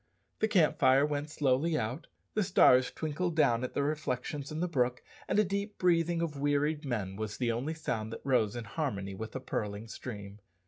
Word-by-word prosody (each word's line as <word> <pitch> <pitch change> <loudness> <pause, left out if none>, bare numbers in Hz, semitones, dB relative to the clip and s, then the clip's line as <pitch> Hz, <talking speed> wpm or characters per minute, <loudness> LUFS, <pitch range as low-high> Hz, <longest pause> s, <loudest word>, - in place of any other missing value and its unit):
The 220 - +3
camp 180 -8 +3
fire 135 +1 +5
went 150 0 -2
slowly 150 +2 +1
out, 125 +8 -3 0.3
the 215 - +1
stars 130 -9 +5
twinkled 160 +2 -2
down 120 -6 +3
at 130 - -4
their 140 - +1
reflections 145 -1 -2
in 155 - -4
the 180 - 0
brook, 125 -6 0 0.2
and - - +1
a 210 - +6
deep 200 +2 -3
breathing 170 -1 +2
of 150 -4 -4
wearied 145 +2 +1
men 100 -7 -3
was 110 -1 -4
the 120 -2 +1
only 135 +8 -2
sound 110 -8 -3
that - - -7
rose 120 -5 +2
in 120 - -4
harmony 100 -5 -3
with 110 +3 -6
the 130 - -3
purling 105 -3 -4
stream. 105 -3 -8
140 Hz, 195 wpm, -31 LUFS, 115-160 Hz, 0.3 s, a